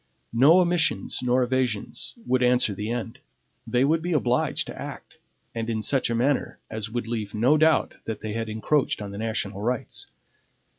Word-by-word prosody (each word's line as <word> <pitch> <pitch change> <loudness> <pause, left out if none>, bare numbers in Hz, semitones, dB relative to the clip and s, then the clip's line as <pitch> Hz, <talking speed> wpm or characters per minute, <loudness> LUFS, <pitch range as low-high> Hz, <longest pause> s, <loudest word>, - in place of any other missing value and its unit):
No 145 +10 +6
omissions 170 - +1
nor 125 0 +2
evasions 125 -4 -2
would 130 0 +2
answer 125 -4 +4
the 105 +3 -4
end. 115 -1 -4 0.5
They 125 +2 +2
would 160 +3 +2
be 175 +1 -1
obliged 125 -4 +1
to - - -8
act, - - -9 0.3
and 115 0 -3
in 110 -1 -1
such 135 0 +1
a 115 - 0
manner 130 +4 0
as 110 -1 -4
would 120 +1 -3
leave 110 -3 -4
no 125 +8 +4
doubt 155 0 +3
that 110 - -4
they 110 -1 -4
had 115 0 -3
encroached 120 +7 0
on 100 -1 -6
the 100 - -7
national 110 -3 -2
rights. 120 +2 -3
120 Hz, 180 wpm, -25 LUFS, 110-130 Hz, 0.5 s, No